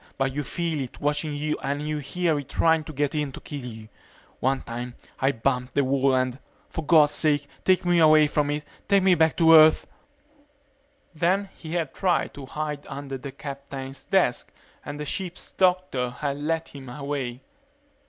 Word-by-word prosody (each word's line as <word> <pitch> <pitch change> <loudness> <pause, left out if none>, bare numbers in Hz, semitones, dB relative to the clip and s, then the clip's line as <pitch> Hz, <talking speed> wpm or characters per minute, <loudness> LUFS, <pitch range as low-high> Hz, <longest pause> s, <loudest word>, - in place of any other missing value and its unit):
But 135 -1 0
you 145 - -1
feel 165 +1 -2
it 130 - -7
watching 150 +1 -1
you 150 +1 -2
and 145 +2 -2
you 155 0 -1
hear 160 +2 0
it 140 -1 -9
trying 160 +2 +3
to - - -7
get 145 -1 -1
in 150 -2 -1
to - - -8
kill 145 -3 -7
you. 110 -3 -8 0.5
One 135 +1 0
time 120 +1 -6 0.2
I 135 +1 +3
bumped 125 +1 -1
the 140 - +3
wall 135 0 +2
and 130 0 0 0.3
for 160 - -4
God's 150 -1 +5
sake 145 -2 +1 0.2
take 185 -1 +3
me 175 -1 +4
away 155 -1 +7
from 145 0 0
it 150 0 -2 0.2
take 200 -2 +4
me 190 -1 +5
back 160 -2 +3
to 165 -1 +6
Earth 155 0 +7 0.7
..." 285 0 -39 0.5
Then 185 +5 +1
he 160 0 -8
had 165 -5 -1
tried 185 -3 0
to 140 -2 -9
hide 150 0 -4
under 135 -1 -6
the 135 +1 -7
captain's 135 -1 -7
desk - - +1 0.3
and 145 0 -7
the 150 - -4
ship's 180 +4 -4
doctor 180 -9 +1
had 140 +3 -3
led 160 +2 -2
him 135 -3 -10
away. 135 -2 -4
145 Hz, 185 wpm, -25 LUFS, 135-160 Hz, 0.7 s, away